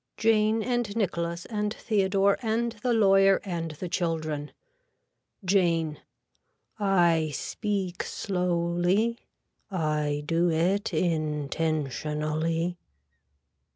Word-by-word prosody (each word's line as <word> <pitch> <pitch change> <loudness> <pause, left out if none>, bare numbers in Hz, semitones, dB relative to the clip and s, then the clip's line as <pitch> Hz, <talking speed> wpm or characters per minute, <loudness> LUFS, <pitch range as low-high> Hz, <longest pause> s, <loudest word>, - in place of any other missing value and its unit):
(Jane 220 0 +3
and 240 -4 -1
Nicholas 170 -5 -1
and 210 -2 -2
Theodore 200 -2 +2
and 230 +1 0
the 250 - +1
lawyer 195 -3 +5
and 170 -4 -3
the 180 +5 -6
children.) 155 -4 -2 0.9
(Jane.) 170 -5 +2 0.8
I 175 -6 +3
speak 195 - -2
slowly. 180 +4 0 0.5
I 150 -5 -1
do 170 +3 +2
it 180 +6 +1
intentionally. 155 +1 -1
175 Hz, 85 wpm, -27 LUFS, 160-200 Hz, 0.9 s, lawyer